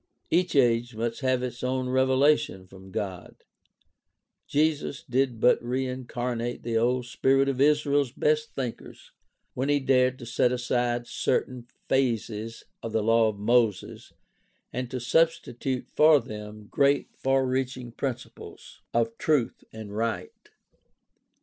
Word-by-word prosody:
Each 180 0 +2
age 120 -3 +3
must 115 +1 -3
have 130 -2 +1
its 120 -1 -5
own 130 0 -1
revelation 130 -5 +2
from 95 0 -14
God. 95 -3 -5 1.1
Jesus 150 -1 0
did 125 -2 0
but 125 - +4
reincarnate 125 -1 -3
the 115 -1 -2
old 125 +2 +1
spirit 135 +3 +2
of 135 -1 -1
Israel's 145 -2 +3
best 155 +3 0
thinkers 125 -4 -6 0.4
when 130 +3 -2
he 145 0 +3
dared 130 -1 +2
to 120 - -9
set 120 +1 +1
aside 120 -1 -1
certain 125 0 -2 0.2
phases 115 -3 -1 0.2
of 115 - -6
the 110 -1 +1
law 115 0 +4
of 105 -2 -3
Moses 110 -2 0 0.6
and 125 -1 -3
to 130 - -4
substitute 135 -2 0
for 155 -1 +6
them 105 -2 -9
great, 140 +5 +1
far 135 0 +1
reaching 130 -1 -2
principles 120 0 -7
of 115 -1 +1
truth 150 -7 0
and 110 -2 -8
right. 115 +1 -2
125 Hz, 130 wpm, -27 LUFS, 115-135 Hz, 1.1 s, for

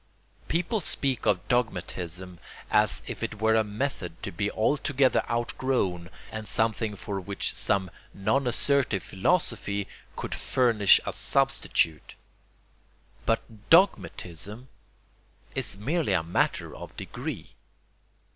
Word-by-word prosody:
People 175 +6 0
speak 135 -5 0
of 90 -4 +1
dogmatism 90 -6 -2 0.3
as 105 -2 +4
if - - -6
it 105 - -4
were 110 +1 +3
a 110 0 +4
method 105 -5 -4
to - - -3
be 100 +4 -1
altogether 140 +4 +2
outgrown 115 -7 -1 0.2
and 110 -1 -5
something 110 -1 +1
for 100 -1 -4
which 100 +2 -2
some 95 -3 +2 0.2
non 130 +7 0
assertive 125 -5 +1
philosophy 100 - 0 0.3
could - - -4
furnish 115 -6 +4
a - - -3
substitute. 80 -2 +1 1.1
But 110 -2 -2
dogmatism 105 - +2 0.8
is - - 0
merely 145 - 0
a 85 -3 +2
matter 85 - 0
of - - -10
degree. - - -6
105 Hz, 110 wpm, -27 LUFS, 95-130 Hz, 1.1 s, as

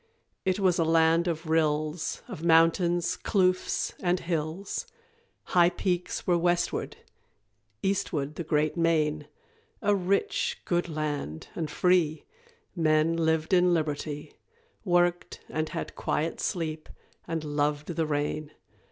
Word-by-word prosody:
It 190 +1 +1
was 185 -3 +2
a - - +4
land 165 +1 +3
of 165 -1 -2
rills, 155 0 0
Of 155 - -8
mountains, 170 +1 +3
kloofs, 185 -3 +1
and 180 0 +1
hills; 170 - -3 0.6
High 175 -1 +4
peaks 180 -1 -2
were 175 -1 +3
westward; 175 0 0 0.9
eastward 155 -7 -1
the 170 - -5
great 150 -1 +1
main 155 -3 +1 0.6
A 205 0 +4
rich 200 - 0
good 175 0 0
land, 150 - -4
and 160 -3 -3
free 165 -1 +2 0.5
Men 155 -1 +3
lived 160 0 +1
in 180 -1 +5
liberty, 150 -1 -3 0.5
Worked 175 -2 +1
and 155 0 -2
had - - -5
quiet 160 +2 -1
sleep, 160 -3 -3 0.4
and 165 -1 -2
loved 145 0 -1
the 165 -2 -1
rain. 150 0 -2
165 Hz, 120 wpm, -28 LUFS, 155-175 Hz, 0.9 s, in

